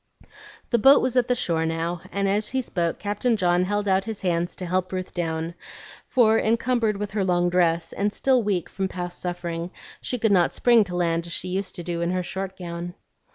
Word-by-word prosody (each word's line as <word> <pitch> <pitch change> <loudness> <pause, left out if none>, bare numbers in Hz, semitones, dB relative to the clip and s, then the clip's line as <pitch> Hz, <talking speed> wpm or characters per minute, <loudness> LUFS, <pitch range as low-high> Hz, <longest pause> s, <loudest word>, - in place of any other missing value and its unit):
The 235 - +3
boat 270 +6 +7
was 255 -1 -1
at 250 -2 +3
the 250 - +2
shore 165 -7 0
now; 165 +1 -2
and 200 0 0
as 205 +2 +1
he 260 0 -1
spoke 170 -6 -1
Captain 210 +3 0
John 180 -1 +2
held 205 +1 -1
out 190 0 +2
his 220 -2 -6
hands 175 -2 -1
to 185 - -6
help 185 +1 -1
Ruth 185 -1 -4
down, 165 -1 -2 0.5
for, 225 -3 +4
encumbered 230 -1 +1
with 205 0 -4
her 205 -1 0
long 175 -1 +2
dress, 170 -2 +1
and 205 +1 0
still 260 +3 +2
weak 200 -5 -1
from 190 -1 -3
past 180 -1 -6
suffering, 175 -1 -4 0.3
she 250 - -3
could 225 -2 +1
not 180 -3 +3
spring 235 -3 +5
to 180 -1 -6
land 170 -1 0
as 170 - -5
she 185 - -3
used 190 +1 -3
to 175 - -6
do 170 -1 -3
in 170 - 0
her 180 0 -1
short 190 +1 -5
gown. 175 0 -6
185 Hz, 215 wpm, -24 LUFS, 175-210 Hz, 0.5 s, boat